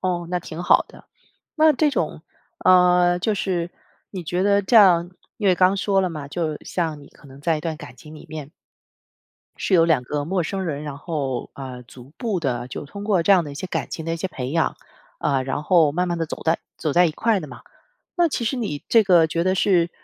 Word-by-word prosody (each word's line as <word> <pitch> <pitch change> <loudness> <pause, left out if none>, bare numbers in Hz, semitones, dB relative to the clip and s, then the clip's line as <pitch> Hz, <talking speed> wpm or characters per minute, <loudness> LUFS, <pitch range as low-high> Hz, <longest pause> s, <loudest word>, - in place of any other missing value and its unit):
哦， 175 -2 -2
那 180 - 0
挺 165 +1 -7
好 - - +4
的。 - - -16 0.5
那 315 0 +5
这 300 +1 +2
种， 160 - -2 0.4
呃， 180 -1 +5
就 210 +3 0
是 180 -3 -2 0.4
你 185 -4 -7
觉 180 +4 -1
得 200 0 +3
这 230 +4 +3
样 175 -4 +6 0.3
因 210 - -2
为 180 - +5
刚 185 +2 +3
说 195 0 +1
了 185 - 0
嘛， 150 -3 -7
就 155 -1 -2
像 160 -4 -3
你 145 - -15
可 - - -19
能 135 +1 -14
在 160 +1 +1
一 - - -7
段 160 -1 -4
感 125 -3 -11
情 155 -1 -13
里 155 - -12
面 150 -2 -7 1.1
是 195 - -2
由 165 -2 +6
两 155 -7 +2
个 145 +2 -3
陌 185 +1 0
生 190 +3 -3
人， 150 -3 -3
然 145 -2 -6
后， 145 -6 -3
呃， 130 -2 -8
逐步 145 - -5
地 125 -5 -2
就 140 - -7
通 200 +8 -9
过 195 -5 +1
这 200 - +4
样 185 -3 +5
的 145 - -7
一 - - -10
些 185 +5 -5
感 - - -3
情 160 - -6
的 165 - -1
一 - - -4
些 190 - -3
培 130 -8 -5
养， 165 0 0 0.4
啊， 135 -2 +1
然 135 +3 -3
后 160 -4 +4
慢 180 +3 -1
慢 175 - -2
地 165 - -1
走 - - -7
在 160 +1 +1 0.2
走 155 - -2
在 180 +1 +5
一 165 - 0
块 220 +6 +1
的 155 - -8
嘛。 120 -1 -11 0.5
那 345 -2 +3
其 275 - -3
实 260 +3 -1
你 175 -12 -4
这 225 -2 +6
个 175 -4 +5
觉 165 +1 -1
得 185 +1 +1
是 180 -3 +2
170 Hz, 255 characters per minute, -22 LUFS, 150-185 Hz, 1.1 s, 样